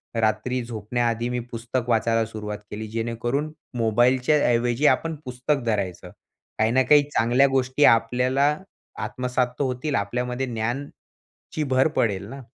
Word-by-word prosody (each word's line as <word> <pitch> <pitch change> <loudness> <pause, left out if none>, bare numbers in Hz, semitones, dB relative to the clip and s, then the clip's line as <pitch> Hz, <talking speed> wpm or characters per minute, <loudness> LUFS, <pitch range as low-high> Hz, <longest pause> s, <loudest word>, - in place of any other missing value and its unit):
रात्री 115 +3 0
झोपण्याआधी 115 +1 -2
मी 125 0 -2
पुस्तक 120 +1 -3
वाचायला 115 0 +2
सुरुवात 105 -1 -6
केली, 110 +1 -5
जेणेकरून 120 +6 -2 0.3
मोबाईलच्या 120 +5 +3
ऐवजी 120 +3 +1
आपण 165 -1 +2
पुस्तक 130 +2 -1
धरायचं. 95 -5 -2 0.5
काही 110 +1 +3
ना 130 +2 +4
काही 150 -1 +7
चांगल्या 125 +1 +3
गोष्टी 135 +1 +1
आपल्याला 125 +5 +3 0.5
आत्मसात 125 +3 -1
तर - - +2
होतील. 130 +3 -2
आपल्यामध्ये 125 +5 -2
ज्ञानची 120 +4 -5 0.5
भर 130 +2 +4
पडेल 100 -3 0
ना. 135 +2 -8
120 Hz, 130 wpm, -24 LUFS, 115-130 Hz, 0.5 s, काही